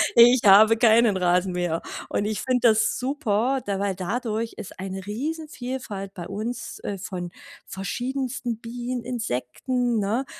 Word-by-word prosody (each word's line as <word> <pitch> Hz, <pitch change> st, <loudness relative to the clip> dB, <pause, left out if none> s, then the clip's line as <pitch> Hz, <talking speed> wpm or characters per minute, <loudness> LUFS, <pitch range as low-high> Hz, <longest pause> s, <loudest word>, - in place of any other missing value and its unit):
Ich 240 Hz, +1 st, +8 dB
habe 215 Hz, +3 st, +8 dB
keinen 225 Hz, -2 st, +5 dB
Rasenmäher. 180 Hz, -2 st, +1 dB, 0.3 s
Und 205 Hz, -, -1 dB
ich 215 Hz, 0 st, -2 dB
finde 250 Hz, -2 st, +2 dB
das 220 Hz, 0 st, +2 dB
super, 260 Hz, -1 st, 0 dB
d 200 Hz, -1 st, -1 dB
weil 200 Hz, -1 st, -1 dB
dadurch 225 Hz, +4 st, -2 dB
ist -, -, -9 dB
eine 190 Hz, 0 st, -5 dB
Riesenvielfalt 250 Hz, -5 st, -5 dB
bei 175 Hz, -3 st, -7 dB
uns, 215 Hz, +5 st, -5 dB
äh, 200 Hz, -, -3 dB
von 180 Hz, -2 st, -6 dB, 0.4 s
verschiedensten 245 Hz, +4 st, -3 dB
Bienen, 240 Hz, +1 st, -5 dB
Insekten, 240 Hz, -, -1 dB
ne? 220 Hz, +7 st, 0 dB
220 Hz, 135 wpm, -25 LUFS, 195-245 Hz, 0.4 s, Ich